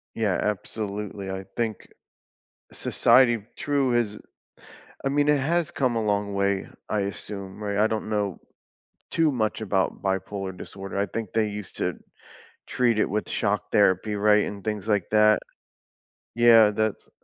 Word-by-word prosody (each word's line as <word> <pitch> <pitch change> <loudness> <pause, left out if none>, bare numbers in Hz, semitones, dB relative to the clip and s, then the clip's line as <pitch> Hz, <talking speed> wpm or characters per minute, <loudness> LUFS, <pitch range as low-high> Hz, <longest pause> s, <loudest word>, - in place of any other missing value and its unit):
Yeah, 105 -5 0
absolutely, 105 -1 -4
I 95 0 -5
think 115 -3 -3 0.8
society 120 -3 +3
true 140 -4 +1
is 105 -3 0 0.9
I - - +2
mean, 145 +1 +2
it 150 - +4
has 165 +3 0
come 125 -4 0
a 115 - +1
long 100 -1 0
way, 100 0 0 0.2
I 105 - 0
assume, 100 +1 -6
right? 100 -1 -2
I 110 +1 +4
don't 110 -1 -3
know 105 -4 -1 0.7
too 160 -3 +2
much 110 -3 -1
about 95 -3 0
bipolar 95 0 -3
disorder, 95 0 -7
I 100 - +2
think 110 +2 -5
they 110 -1 +2
used 105 -2 -8
to - - -1 0.7
treat 120 -3 +1
it - - +2
with 105 +2 -2
shock 105 0 -1
therapy, 105 +1 +3
right, 105 +1 +4
and 100 -1 -6
things 105 -1 -3
like 105 -4 +1
that. 105 0 +5 1.0
Yeah, 115 -3 +7
that's 110 0 -2
105 Hz, 150 wpm, -25 LUFS, 100-115 Hz, 1.0 s, Yeah